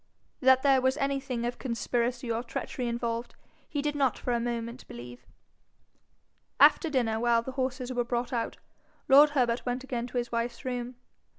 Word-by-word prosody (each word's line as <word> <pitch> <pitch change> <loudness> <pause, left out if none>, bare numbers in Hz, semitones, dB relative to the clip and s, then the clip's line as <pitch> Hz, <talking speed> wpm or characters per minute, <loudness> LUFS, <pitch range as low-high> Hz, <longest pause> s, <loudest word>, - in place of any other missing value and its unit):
That 260 0 +5
there 270 -2 +5
was 260 +2 +2
anything 270 -4 -1
of 245 0 -3
conspiracy 240 0 -1
or 230 +1 0
treachery 245 +1 -4
involved, 235 0 -3 0.3
he 290 -3 -2
did 295 0 0
not 275 -4 +1
for 245 - -2
a 235 - +1
moment 235 +1 -4
believe. 120 +1 -10 1.3
After 330 - +6
dinner, 235 -6 0
while 235 0 +3
the 260 - -5
horses 255 -1 -3
were 245 -1 +1
brought 240 +1 -2
out, 235 -1 -2 0.5
lord 290 +1 +8
Herbert 240 -2 +2
went 250 +1 -2
again 245 -3 -3
to 250 - -5
his 240 -1 -2
wife's 235 +2 -3
room. 245 -1 -3
245 Hz, 170 wpm, -29 LUFS, 235-260 Hz, 1.3 s, lord